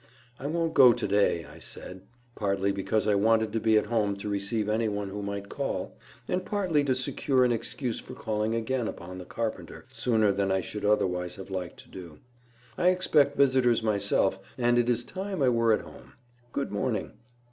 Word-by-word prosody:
"I 140 - -4
won't 165 +1 -1
go 125 -5 +8
to - - -3
day," 100 -5 +2
I 75 +3 -13
said, 90 +3 -7 0.3
partly 100 -3 0
because 100 +2 -1
I 105 - +4
wanted 110 +1 +2
to 115 - +1
be 110 0 +3
at - - +2
home 105 -3 0
to 100 +1 -7
receive 100 +2 -1
any 110 +1 +1
one 100 -1 -3
who 105 +1 -5
might 100 0 -4
call, - - -4 0.3
and 180 0 -1
partly 185 -9 +1
to 130 -2 +2
secure 130 +1 +1
an 125 - +2
excuse 115 +1 -2
for - - -10
calling 110 +1 -1
again 115 +1 -1
upon 90 +2 -7
the 90 - -8
carpenter 115 +2 -5
sooner 110 -4 +2
than 100 0 0
I 95 0 +2
should 105 +4 -5
otherwise 90 -4 +1
have 95 0 -10
liked 90 -2 -4
to - - -19
do. 85 -5 -10 0.6
"I 175 - +3
expect 150 -6 +3
visitors 130 -4 +3
myself, 100 -2 +1 0.2
and 120 -1 +3
it 120 0 +1
is 120 0 +1
time 190 -2 -4
I 130 - +5
were 115 -1 +3
at 110 - +2
home. - - -14 0.4
Good 140 - -3
morning." 105 0 -2
110 Hz, 195 wpm, -28 LUFS, 100-125 Hz, 0.6 s, go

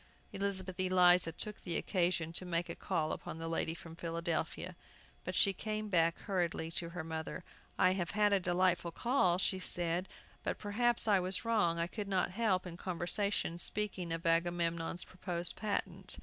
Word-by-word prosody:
Elizabeth 190 -2 0
Eliza 180 -2 +5
took 210 +5 -5
the 170 -3 -2
occasion 175 -3 0
to 180 - +4
make 175 -1 -1
a - - -4
call 155 -1 -1
upon - - -5
the 165 0 -5
lady 165 0 -1
from 165 -1 -11
Philadelphia, 170 +1 -3 0.5
but 185 - -4
she 195 - +5
came 215 +2 -3
back 170 -3 +3
hurriedly 175 -4 -1
to 170 0 -1
her 170 -1 -5
mother. 160 +2 -5 0.3
"I 185 -1 +5
have 180 -3 -1
had 210 -1 +4
a 200 - +4
delightful 180 -1 +2
call," 185 -2 +2
she 190 0 0
said; 175 0 -1 0.3
"but - - -2
perhaps 235 +3 +1
I 200 -3 +5
was 185 +3 +1
wrong 210 -8 +2
I 170 - +1
could 205 +3 -5
not 190 -2 +1
help, 190 -3 +1
in 170 -1 -7
conversation, 175 0 -1
speaking 190 -4 -2
of 165 0 -3
Agamemnon's 170 0 +1
proposed 180 -2 -2
patent. 195 -3 -3
180 Hz, 170 wpm, -34 LUFS, 170-195 Hz, 0.5 s, Eliza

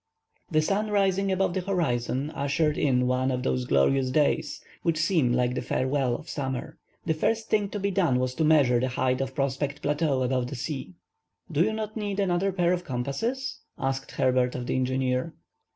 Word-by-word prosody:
The 155 -2 +2
sun 205 +5 0
rising 195 -1 +2
above 190 -1 +1
the 185 - -1
horizon, 145 -6 -1
ushered 150 +2 0
in 125 -3 +2
one 130 +1 +1
of 125 -1 -1
those 125 -1 0
glorious 130 - +2
days 145 +2 +1 0.2
which 165 -2 +1
seem 155 -6 +2
like 125 0 +1
the 125 - -2
farewell 130 -2 0
of - - -9
summer. 135 -4 -4 0.3
The 160 - +2
first 220 +8 -1
thing 210 -2 +2
to 205 - -4
be 200 0 0
done 175 -10 +2
was 130 0 0
to 160 - -1
measure 145 -6 +4
the 130 - 0
height 130 0 0
of 135 0 -4
Prospect 140 +1 -2
Plateau 145 -2 +1
above 125 -1 0
the 140 - -6
sea. 130 - -5 0.6
"Do 150 - +1
you 210 +5 +3
not 215 -1 -4
need 205 -2 -3
another 195 0 +1
pair 180 -1 +2
of 180 0 -2
compasses?" 160 - -3 0.2
asked 135 0 -3
Herbert, 125 -1 +2
of 125 -1 -4
the - - -1
engineer. 130 +3 0
140 Hz, 190 wpm, -27 LUFS, 130-180 Hz, 0.6 s, measure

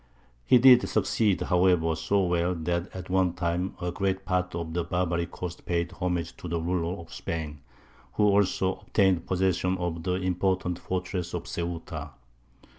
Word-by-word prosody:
He 125 - +7
did 125 0 +7
succeed, 105 -1 +1
however, 90 -3 +3
so 95 +5 +1
well, 90 0 +1
that 85 +3 -2
at 90 -1 -8
one 95 -2 +2
time 90 +1 -2
a 90 -1 -2
great 95 +1 -1
part 90 -1 -1
of 85 -1 -4
the 85 0 0
Barbary 85 -1 -1
coast 90 -1 -7
paid 85 0 0
homage 90 -3 -2
to - - -8
the 85 0 -1
ruler 85 +1 -1
of 85 0 -11
Spain, 75 -3 -4 0.5
who 105 - +1
also 100 -2 +2
obtained 95 -5 +1
possession 95 0 +1
of 85 -2 -3
the 90 +2 -1
important 90 -1 0
fortress 90 -1 -3
of - - -3
Ceuta. 80 -3 -4
90 Hz, 160 wpm, -27 LUFS, 85-95 Hz, 0.5 s, He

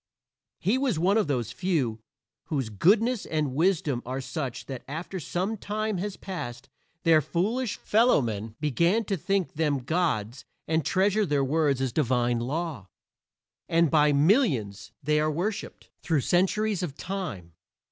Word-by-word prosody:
He 210 +9 +1
was 260 - +1
one 185 +5 +3
of 220 -6 +2
those 120 -5 -1
few 135 - -1 0.4
whose 135 -9 -2
goodness 215 - +3
and 150 -4 -1
wisdom 155 -5 +1
are 130 +2 -4
such 135 -2 -4
that 130 -3 -6
after 165 +6 -5
some 185 +7 -2
time 210 -1 -2
has 200 +1 -4
passed 120 -11 -6 0.3
their 160 -2 +5
foolish 205 - -1
fellowmen 115 - +1
begin 170 - +2
to 195 - -1
think 195 +2 -1
them 145 -4 0
gods 130 - -1 0.2
and 160 0 +1
treasure 200 +5 +2
their 145 -7 +1
words 140 -1 +1
as 130 -3 -1
divine 125 -4 +1
law; 140 - -3 0.8
and 165 -2 +3
by 150 -1 +5
millions 140 - +2
they 150 +2 +2
are 155 0 +2
worshiped 180 +8 -4
through 160 -5 +1
centuries 195 - +1
of 155 -6 -4
time. 155 - -5
160 Hz, 145 wpm, -27 LUFS, 130-195 Hz, 0.8 s, their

